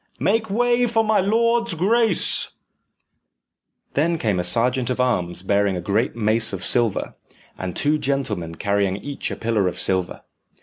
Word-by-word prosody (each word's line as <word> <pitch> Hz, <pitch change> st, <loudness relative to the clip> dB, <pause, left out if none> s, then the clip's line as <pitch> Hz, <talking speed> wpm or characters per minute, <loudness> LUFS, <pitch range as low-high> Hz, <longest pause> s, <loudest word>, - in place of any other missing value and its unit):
make 220 Hz, +1 st, 0 dB
way 245 Hz, +3 st, +2 dB
for 225 Hz, -1 st, +1 dB
my 215 Hz, -1 st, +2 dB
lord's 230 Hz, +1 st, +1 dB
grace." 210 Hz, +3 st, +1 dB, 1.4 s
Then 165 Hz, +4 st, +1 dB
came 105 Hz, -, -1 dB
a -, -, -1 dB
sergeant 120 Hz, +6 st, +2 dB
of 125 Hz, -, -2 dB
arms 90 Hz, -8 st, -1 dB
bearing 100 Hz, -1 st, +1 dB
a -, -, -3 dB
great 100 Hz, +9 st, -1 dB
mace 110 Hz, -1 st, +3 dB
of 95 Hz, -, -4 dB
silver, 120 Hz, -4 st, 0 dB, 0.4 s
and 90 Hz, -2 st, -6 dB
two 150 Hz, +1 st, +1 dB
gentlemen 105 Hz, -, -2 dB
carrying 100 Hz, 0 st, 0 dB
each 140 Hz, +7 st, -4 dB
a -, -, -4 dB
pillar 110 Hz, -4 st, 0 dB
of 90 Hz, -, -3 dB
silver. 95 Hz, -2 st, -1 dB
120 Hz, 150 wpm, -21 LUFS, -, 1.4 s, mace